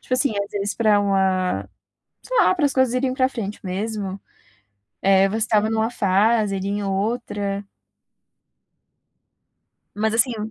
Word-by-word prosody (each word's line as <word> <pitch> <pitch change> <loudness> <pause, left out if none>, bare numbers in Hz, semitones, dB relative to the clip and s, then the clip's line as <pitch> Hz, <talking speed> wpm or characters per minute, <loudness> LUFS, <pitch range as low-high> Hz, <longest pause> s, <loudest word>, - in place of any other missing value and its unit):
Tipo 255 - -2
assim 260 0 +1
às 200 - -9
vezes 205 0 -2
para 215 -3 +3
uma, 190 -2 0 0.5
sei - - -3
lá, 400 - +4
para 335 - -2
as 280 - +1
coisas 260 -2 +2
irem 255 0 0
para 260 -1 +2
frente 215 -6 -5
mesmo, 195 +1 -4 0.8
eh, 195 0 +4
você 210 +3 -3
estava 215 -1 +1
numa 220 0 +1
fase, 210 0 +2
e - - -2
ele 195 - -4
em 205 +1 -2
outra. 200 0 -2 2.3
Mas, 215 +1 0
assim 240 +2 +3
hum, 215 +1 -5
210 Hz, 155 wpm, -22 LUFS, 195-235 Hz, 2.3 s, lá